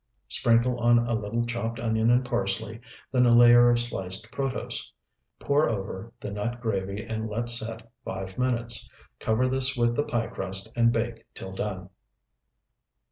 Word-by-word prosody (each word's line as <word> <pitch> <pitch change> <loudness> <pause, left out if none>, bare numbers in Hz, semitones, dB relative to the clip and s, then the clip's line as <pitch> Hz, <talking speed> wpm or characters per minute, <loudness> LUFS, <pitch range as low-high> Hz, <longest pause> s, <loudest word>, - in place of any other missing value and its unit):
Sprinkle 120 +1 +2
on 120 0 +5
a 120 0 +1
little 110 +2 -1
chopped 115 -1 -3
onion 110 0 +1
and 125 +1 +4
parsley, 115 -1 -2 0.3
then 125 -1 +4
a - - +5
layer 120 0 +8
of 120 - +4
sliced 110 -2 -3
protose. 135 -4 -3 0.5
Pour 145 0 +2
over 100 +1 -4
the 100 - -6
nut 115 +4 -3
gravy 100 -3 -2
and 110 -1 -3
let 120 +3 -2
set 115 -1 -2 0.2
five 95 0 -5
minutes. 120 -2 -1 0.3
Cover 110 +4 +1
this 130 +1 0
with 120 0 +2
the 145 - +1
pie 120 -5 -1
crust 95 +2 -5
and 115 0 +4
bake 115 0 -3
till 95 - -7
done. 95 -2 -4
115 Hz, 155 wpm, -27 LUFS, 110-120 Hz, 0.5 s, layer